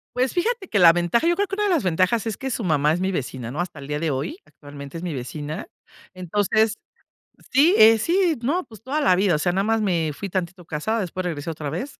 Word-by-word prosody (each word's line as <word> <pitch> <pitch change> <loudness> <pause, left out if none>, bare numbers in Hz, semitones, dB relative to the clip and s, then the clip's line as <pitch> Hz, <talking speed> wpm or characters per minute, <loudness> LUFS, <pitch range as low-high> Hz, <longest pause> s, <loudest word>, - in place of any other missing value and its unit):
Pues 255 +1 0
fíjate 420 +2 -1
que 205 - 0
la 165 -2 +8
ventaja, 175 - +1
yo 345 - +3
creo 405 0 0
que 390 - -4
una 420 - 0
de - - +1
las 340 -6 +2
ventajas 185 +5 +1
es 220 - -3
que 265 -1 -4
su 230 - -3
mamá 150 -4 +2
es 175 - -2
mi 190 +1 0
vecina, 125 -6 -4
¿no? 145 - -6
Hasta 175 -5 -6
el 140 - -9
día 150 0 -2
de 165 - -1
hoy, 140 - -3
actualmente 145 +1 -11
es 170 - -8
mi 175 - -3
vecina. 145 - -6 0.5
Entonces. 205 +4 +1 0.8
Sí, 300 +8 +5
eh, 220 +1 +8
si 345 - +2
no, 340 +9 0
pues 220 - -16
toda 285 +5 -1
la 185 -11 +4
vida, 190 -1 +2
o - - -1
sea, 175 +3 +1
nada 190 +2 0
más 225 +1 +1
me 170 -6 0
fui 195 +7 -6
tantito 175 -1 -4
casada, 190 +10 -2
después 185 -1 -4
regresé 165 -2 -4
otra 150 -3 -5
vez. 255 - -5
185 Hz, 250 wpm, -23 LUFS, 160-245 Hz, 0.8 s, la